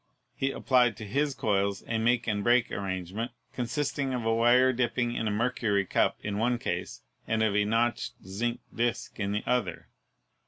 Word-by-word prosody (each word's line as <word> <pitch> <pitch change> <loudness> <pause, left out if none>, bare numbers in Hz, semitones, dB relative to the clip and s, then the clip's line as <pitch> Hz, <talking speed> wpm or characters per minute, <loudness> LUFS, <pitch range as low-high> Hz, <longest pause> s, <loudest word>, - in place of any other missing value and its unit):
He 135 +2 -1
applied 125 -4 +2
to 110 - -7
his 140 +6 0
coils 100 -4 0
a 115 -1 -1
make 120 +1 +2
and 105 -2 -1
break 120 +1 +3
arrangement, 95 +4 -3 0.2
consisting 135 +2 -1
of 120 -2 -3
a 115 - +3
wire 125 +3 +5
dipping 120 0 0
in 115 - -1
a - - +2
mercury 105 -2 +1
cup - - +1
in 105 0 -2
one 120 +2 +2
case - - -4 0.2
and 110 0 +1
of 105 -2 +1
a 105 0 +3
notched 120 +3 0
zinc 115 +6 -2
disk 120 -1 -2
in 100 -1 -1
the 105 +1 -1
other. 125 0 -1
115 Hz, 180 wpm, -29 LUFS, 105-125 Hz, 0.2 s, wire